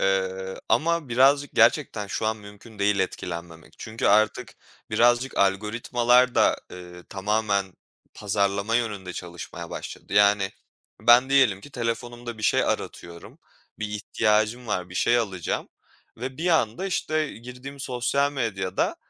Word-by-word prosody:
Iıı, 95 0 -1
ama 170 -2 +1
birazcık 135 +4 +4
gerçekten 110 -9 +3
şu 110 - -2
an 110 0 0
mümkün 105 +1 -14
değil 100 0 +2
etkilenmemek 85 -3 -5
çünkü 110 +1 -3
artık 110 +1 +2 0.4
birazcık 120 +4 +3
algoritmalar 120 +5 +2
da, - - +4 0.2
ııı, 90 -1 -11
tamamen 100 -1 -1 0.4
pazarlama 100 +2 0
yönünde 105 -6 -3
çalışmaya 85 -1 -8
başladı. - - -8
Yani 100 -1 +4 0.5
ben 120 +4 +6
diyelim 125 -9 +4
ki, 145 - -13
telefonumda 120 -1 -4
bir 105 - -9
şey - - +3
aratıyorum, 85 0 -5 0.4
bir 105 - -3
ihtiyacım 110 +2 0
var, 90 -4 -2
bir 90 - -11
şey 120 +5 +3
alacağım 95 -7 -3 0.5
ve 130 +3 -6
bir 175 +3 0
anda, 160 - +1
işte, 155 -4 -1
girdiğim 125 +4 -10
sosyal 130 +3 0
medyada 100 -9 -1
110 Hz, 130 wpm, -25 LUFS, 100-125 Hz, 0.5 s, ben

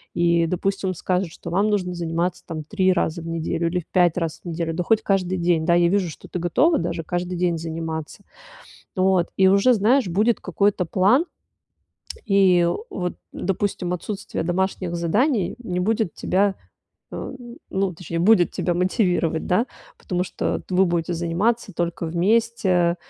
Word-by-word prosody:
И, 170 -1 +3
допустим, 195 +2 -1
он 185 - -3
скажет, 180 +1 -1
что 170 - -8
вам 200 +4 +2
нужно 185 -3 0
заниматься 170 +1 -2
там 155 -2 -5
3 190 +3 +1
раза 170 -2 0
в 165 - -8
неделю 165 0 -1
или 180 +2 0
в - - -22
5 175 -3 +2
раз 165 -2 -3
в - - -32
неделю, 165 0 -2
да 175 +2 -2
хоть 220 +2 +2
каждый 185 -2 0
день. 170 -2 +1
Да, 170 - +4
я 175 0 +4
вижу, 190 -2 +1
что - - -11
ты 180 - -4
готова 280 - +2
даже 165 - -3
каждый 175 +2 -3
день 175 -2 +1
заниматься. 160 +2 -5 0.7
Вот, 185 -2 +2
и 190 0 +5
уже, 200 +6 +5
знаешь, 230 +2 +3
будет 215 +7 +2
какой-то 200 -3 0
план. 205 - +3 1.0
И 185 -4 +4 0.2
вот, 180 -1 -3 0.2
допустим, 190 -2 -2
отсутствие 200 +3 -4
домашних 180 0 -1
заданий 205 - +1
не 180 -5 -3
будет 215 -1 0
тебя, 195 +1 +1 0.6
а, - - -6 0.4
ну, 190 -1 -1
точнее, 170 0 -5
будет 180 -1 +4
тебя 175 - -1
мотивировать, 180 -3 0
да, 185 +7 +2 0.3
потому 180 -1 -2
что - - -2
т 185 - -9
вы 190 +1 +5
будете 170 0 -1
заниматься 190 +6 -1
только 170 0 -2
вместе. 180 -1 +2
180 Hz, 165 wpm, -23 LUFS, 170-195 Hz, 1.0 s, и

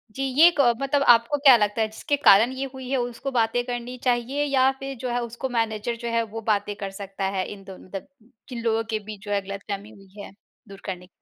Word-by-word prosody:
जी, 270 - -2 0.2
ये 340 - +10
क 245 -4 +5
मतलब 275 +1 +1
आपको 235 +4 +5
क्या 275 -3 +8
लगता 210 0 0
है 220 - +2
जिसके 220 +7 -2
कारण 230 -3 +6
ये 275 - -1
हुई 260 -1 -8
है 270 - +1
उसको 245 +2 -3
बातें 240 -1 +1
करनी 245 0 -5
चाहिए, 250 +3 0
या 270 -2 +3
फिर 270 0 -6
जो 255 - -3
है 245 0 -1
उसको 235 +3 -5
मैनेजर 225 -1 -1
जो - - -1
है 230 0 +1
वो 225 - -4
बातें 205 -1 0
कर 195 -1 -6
सकता 195 0 -5
है 185 - 0
इन 195 -1 -13
दोनों 190 -1 -12
दन 195 - -6 0.4
जिन 240 -3 -5
लोगों 225 -1 +1
के 220 -1 -1
बीच 210 -1 -9
जो 205 - -5
है 200 -1 +1
गलतफ़हमी 200 +1 -6
हुई 200 -1 -14
है, - - -10 0.4
दूर 195 -1 -12
करने 180 -2 -6
230 Hz, 235 wpm, -24 LUFS, 205-255 Hz, 0.4 s, ये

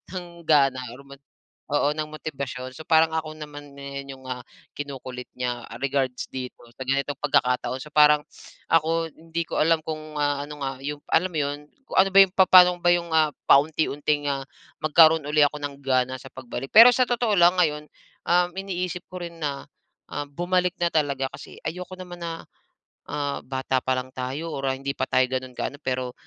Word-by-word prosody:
ng 175 -2 -8
gana, 135 -4 +4 1.0
oo, 145 0 +2
ng 155 0 -3
motibasyon. 140 -4 -6
So, 160 - -8
parang 160 0 +4
ako 155 -1 -3
naman 145 -2 -10
na 140 0 -7
yung, 135 -1 -10
ah, 125 - -4
ang - - -51 0.3
kinukulit 130 -3 -7
niya, 125 -1 -3
ah, 115 - -10
regards 135 -2 -1
dito 130 -1 -7 0.2
sa 130 - -5
ganitong 140 +1 0
pagkakataon. 125 -2 +1
So 150 - -12
parang, 150 0 +5 0.5
ako 165 0 +2
hindi 165 +1 -4
ko - - -2
alam 165 +1 +3
kung, 155 -1 -6
ah, 145 -1 0
ano 150 -1 -10
nga 135 -1 -4
yung 145 +1 -4
alam 180 +3 +3
mo - - -10
yun, 145 +1 -3 0.2
kung - - -5
ano 195 +1 +5
ba - - +10
yung, 190 - -3
papano 185 -1 +8
ba 175 0 +3
yung, 170 -1 -4
ah, 155 -1 +4 0.2
paunti-unti, 145 0 +3
ah, 135 -1 -3 0.4
magkaroon 160 0 +5
uli 150 0 +4
ako 145 +1 -2
ng 145 -1 -4
gana 130 -1 +1
sa 135 - -11
pagbalik. 130 0 -7
Pero, 230 +3 +10
sa 255 - +4
totoo 240 -3 +1
lang 175 +1 +5
ngayon, 150 -3 +1 0.4
um, 175 +1 +3
iniisip 180 -2 -3
ko 185 - -7
rin 170 -1 -8
na, 140 -2 -3 0.4
ah, 145 0 -4
bumalik 180 +4 0
na 170 - +3
talaga. 140 -3 +1
Kasi - - -11
ayoko 180 +3 -5
naman 180 -1 -9
na, 165 -1 -6 0.6
ah, 145 -1 -3
bata 130 0 -1
pa 130 0 0
lang 130 0 -5
tayo 135 +6 -4
or 135 0 -3
ah, 130 - 0
hindi 140 +1 -3
pa 130 -1 -2
tayo 130 0 +3
gano'n 130 -1 -4
ka-ano 145 - -4
pero, 130 -2 -2
150 Hz, 190 wpm, -25 LUFS, 135-165 Hz, 1.0 s, ba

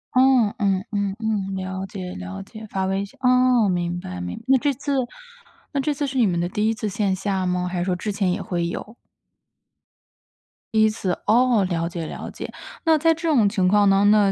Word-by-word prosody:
嗯 255 -5 +5
嗯 195 -1 +1
嗯 200 -1 -1
嗯， 205 -3 -1
了 190 0 -4
解 185 -2 -6
了 95 +1 -7
解， 220 - -11
发 190 -1 -1
微 195 +1 0
信， 200 - -12
哦， 250 -3 +4
明 175 -1 -1
白， 90 - -7
明 90 0 -5
那 270 - +6
这 290 +1 +1
次 285 +2 -4 0.8
那 280 -2 0
这 300 - 0
次 290 0 -2
是 265 -1 -2
你 225 - +5
们 175 -2 0
的 175 - 0
第 210 +3 0
1 - - +1
次 215 -1 -4
线 200 -1 0
下 190 -1 -1
吗？ 180 0 0
还 180 0 -3
是 175 - -1
说 180 -1 0
之 210 +4 -3
前 195 -2 0
也 - - -1
会 170 -2 -2
有？ 215 +6 -6 1.8
第 220 - +4
1 220 - +5
次？ 195 -4 -2
哦， 240 -2 +4
了 170 -1 -1
解 170 -2 -5
了 - - -7
解。 - - -7 0.3
那 320 -2 +4
在 325 +2 +4
这 330 +1 -3
种 235 -9 +4
情 195 -3 +1
况 205 +1 +4
当 195 +1 +4
中 205 - +6
呢， 215 - +6
200 Hz, 225 characters per minute, -23 LUFS, 180-230 Hz, 1.8 s, 那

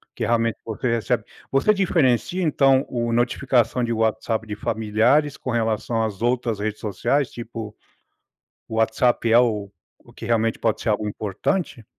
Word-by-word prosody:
que - - -4
realmente 115 -1 +1
você 115 +2 -2
recebe 115 - -1 0.3
você 140 +11 +3
diferencia 175 - +1
então, 135 -4 +3
o 120 -1 -2
notificação 125 +1 +1
de 120 - -1
WhatsApp 110 0 -1
de 105 - -4
familiares 110 +8 +1
com 125 - -4
relação 115 0 0
às 105 -3 -4
outras 120 -2 0
redes 105 +1 -3
sociais? 135 +6 0
Tipo, 115 -2 -7 0.9
o 110 - -6
WhatsApp 115 +2 +2
é 115 - +7
o 105 -5 0 0.3
o - - -19
que - - -9
realmente 115 -1 +1
pode 110 -2 0
ser 115 - -1
algo 105 0 0
importante? 110 - -3
115 Hz, 155 wpm, -23 LUFS, 110-125 Hz, 0.9 s, é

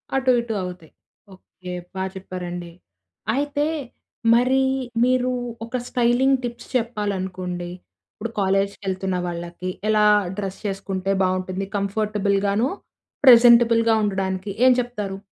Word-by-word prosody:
అటు 260 -1 +3
ఇటు 235 -1 -3
అవుతాయి. 180 -3 -8 0.4
ఓకె, 185 -1 -10 0.2
బా 190 - -2
చెప్పారండి. 180 -2 -6 0.6
అయితే 290 +1 0 0.7
మరి 255 +3 +3 0.4
మీరు 255 0 +2 0.3
ఒక 235 +2 -3
స్టైలింగ్ 250 +2 +3
టిప్స్ 240 0 -6
చెప్పాలనుకోండి, 190 -6 -2 0.4
ఇప్పుడు 230 +2 -5
కాలేజ్‌కి 195 +1 0
ఎళ్తున్న 190 0 -2
వాళ్ళకి 175 +1 -5 0.2
ఎలా 215 -1 +4 0.3
డ్రెస్ 195 -2 -4
చేసుకుంటే 195 -1 -2
బావుంటుంది. 185 +1 -1
కంఫర్టబుల్‌‌గాను, 200 +1 0 0.6
ప్రెజెంటబుల్‌‌గా 235 -2 +7
ఉండడానికి. 190 -1 -2 0.2
ఏం 255 - +8
చెప్తారు? 210 -6 -3
200 Hz, 100 wpm, -23 LUFS, 185-235 Hz, 0.7 s, ఏం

